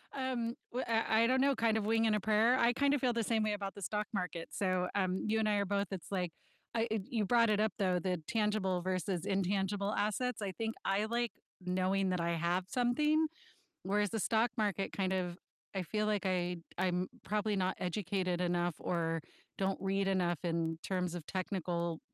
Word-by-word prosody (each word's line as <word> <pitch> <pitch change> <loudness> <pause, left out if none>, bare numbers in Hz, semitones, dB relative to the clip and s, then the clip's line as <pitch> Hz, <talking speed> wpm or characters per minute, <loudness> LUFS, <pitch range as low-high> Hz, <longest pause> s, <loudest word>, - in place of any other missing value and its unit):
Um, 255 -3 -1 0.2
w 250 +2 -1
uh, 225 -1 +2
I 220 +1 +5
i 230 - +4
don't 260 +1 +3
know, 275 0 +4
kind 225 -2 +2
of 220 -2 0
wing 225 0 +3
and 220 -1 +3
a - - +1
prayer, 220 +4 +4
I 235 +1 +5
kind 280 +3 +2
of 290 - +1
feel 250 -3 +2
the 230 - 0
same 225 +1 +1
way 215 -1 +1
about 200 -1 -4
the 200 - -10
stock 210 +2 -1
market, 180 -3 -3
so, 185 -2 0
um, 185 -2 0
you 220 +1 +2
and 215 -1 +2
I 210 - +3
are 200 0 +1
both, 200 0 0
it's 190 -1 -6
like 180 -4 -1 0.4
I 230 0 +2
it 220 -2 +1
you 225 -4 0
brought 230 +1 +4
it 210 -1 +3
up, 215 0 +2
though, 185 -2 +2
the 180 -1 -1
tangible 210 -5 +1
versus 185 -1 -1
intangible 195 +1 0
assets, 220 +4 0
I 200 -2 -2
think 225 0 -1
I 200 +2 +2
like 235 +1 0 0.3
knowing 185 +1 +1
that 180 -2 0
I 170 0 +1
have 175 +2 0
something, 300 +7 +2 0.6
whereas 205 +1 +1
the 225 - -2
stock 225 +3 +2
market 205 -3 0
kind 190 -1 0
of 180 -2 -2 0.4
I 190 - 0
feel 210 +4 -1
like 210 -2 0
I 180 -1 0 0.2
I'm 180 0 +1 0.2
probably 210 +1 0
not 185 -1 0
educated 180 -1 -1
enough 175 -1 +1
or 165 -2 -1 0.4
don't 195 0 0
read 195 0 +1
enough 175 -4 +1
in 165 -1 0
terms 180 -2 -1
of 170 -3 -6
technical 175 -3 -2
195 Hz, 210 wpm, -34 LUFS, 180-220 Hz, 0.6 s, I